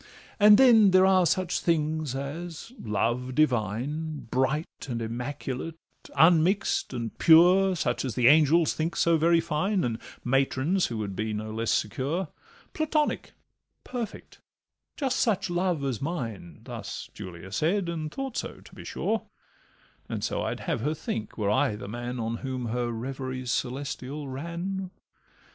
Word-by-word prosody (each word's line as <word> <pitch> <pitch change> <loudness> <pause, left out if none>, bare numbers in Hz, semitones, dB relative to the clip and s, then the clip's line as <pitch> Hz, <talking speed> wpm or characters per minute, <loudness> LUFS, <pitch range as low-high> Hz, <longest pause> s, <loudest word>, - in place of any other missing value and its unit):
And 210 0 +8
then 225 -6 +7
there 185 0 +6
are 185 -2 +5
such 180 +2 0
things 155 -4 0
as 160 - -6
love 120 +4 -1
divine, 145 +3 0
Bright 140 +5 -1
and 120 -2 -2
immaculate, 130 +6 -4 0.4
unmix'd 175 +4 +4
and 120 -3 -4
pure, 180 +4 +6
Such 125 -7 -1
as 130 -6 -3
the 125 - +1
angels 155 +3 +5
think 160 +2 -2
so 170 0 +3
very 165 +2 +4
fine, 170 +4 0
And 115 -2 -2 0.2
matrons 135 +7 +1
who 115 - -4
would 100 -3 -4
be 110 +1 -2
no 110 +1 -4
less 115 +1 -2
secure, 145 - -1 0.4
Platonic, 310 -1 0 0.5
perfect, 245 -3 -6 0.6
'just 270 -3 0
such 205 -6 +1
love 175 -4 0
as 130 -5 -2
mine;' 115 - -5
Thus - - -7
Julia 90 +1 -9
said—and 165 - -1
thought 270 - -5
so, - - -3
to - - -17
be - - -10
sure; - - -2 0.8
And - - -3
so - - -1
I'd - - -3
have - - -2
her 150 +5 0
think, 110 -7 -5
were 105 -2 +1
I 130 -1 +2
the 105 - -8
man 120 +3 -5
On 115 0 -2
whom 130 -2 -4
her 120 +1 -1
reveries 130 +1 -4
celestial 140 +3 -3
ran. 170 +7 -4
145 Hz, 145 wpm, -27 LUFS, 120-175 Hz, 0.8 s, And